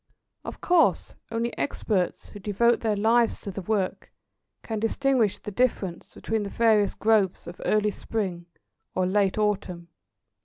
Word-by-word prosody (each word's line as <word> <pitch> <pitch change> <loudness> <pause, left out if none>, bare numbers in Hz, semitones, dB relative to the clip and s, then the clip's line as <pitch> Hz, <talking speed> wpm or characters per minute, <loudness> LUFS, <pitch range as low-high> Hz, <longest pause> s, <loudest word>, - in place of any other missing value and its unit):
Of - - -8
course, 350 -2 +2 0.2
only 230 +1 -2
experts, 195 -9 -1
who 205 - -10
devote 220 +4 +2
their 220 -2 0
lives 225 +3 +2
to 200 - -5
the 195 - -6
work, 195 -1 -2 0.5
can 220 -2 -3
distinguish 230 -1 +1
the 210 - -8
difference 200 -6 -1
between 220 0 -2
the 200 - -4
various 215 -3 +3
growths 215 -4 +2
of 175 - -9
early 210 0 +2
spring 185 -6 -4 0.5
or 185 - +1
late 195 +1 +1
autumn. 190 -5 -1
210 Hz, 145 wpm, -26 LUFS, 190-225 Hz, 0.5 s, various